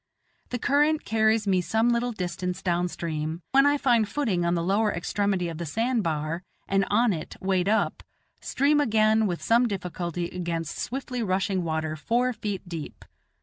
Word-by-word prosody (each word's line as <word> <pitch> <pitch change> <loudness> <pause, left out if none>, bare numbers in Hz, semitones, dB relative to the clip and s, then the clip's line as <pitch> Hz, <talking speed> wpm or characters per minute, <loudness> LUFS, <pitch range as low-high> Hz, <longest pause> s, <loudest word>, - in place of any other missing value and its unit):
The 245 - -2
current 295 +4 +2
carries 220 0 +2
me 190 -2 +2
some 220 +7 +1
little 240 +1 +1
distance 180 -2 -4
down 175 -1 +1
stream, 160 -1 -4
when 275 +1 +5
I 290 0 +3
find 235 -6 +2
footing 215 -12 0
on 170 0 +1
the 170 - -1
lower 205 +4 +2
extremity 190 +1 -1
of 165 -1 -6
the 170 - -3
sand 230 - 0
bar, 160 -1 -2 0.3
and 195 0 +2
on 230 +1 +3
it, 155 -3 -6
wade 190 0 +1
up; 220 - +1 0.4
stream 290 +2 +2
again 220 -3 +3
with 175 -3 -3
some 235 +2 +4
difficulty 175 -3 -3
against 170 -3 -4
swiftly 250 -1 -3
rushing 190 -2 0
water 160 -1 -2
four 240 +9 0
feet 205 -4 -5
deep. 165 -3 -7
195 Hz, 170 wpm, -26 LUFS, 175-230 Hz, 0.4 s, when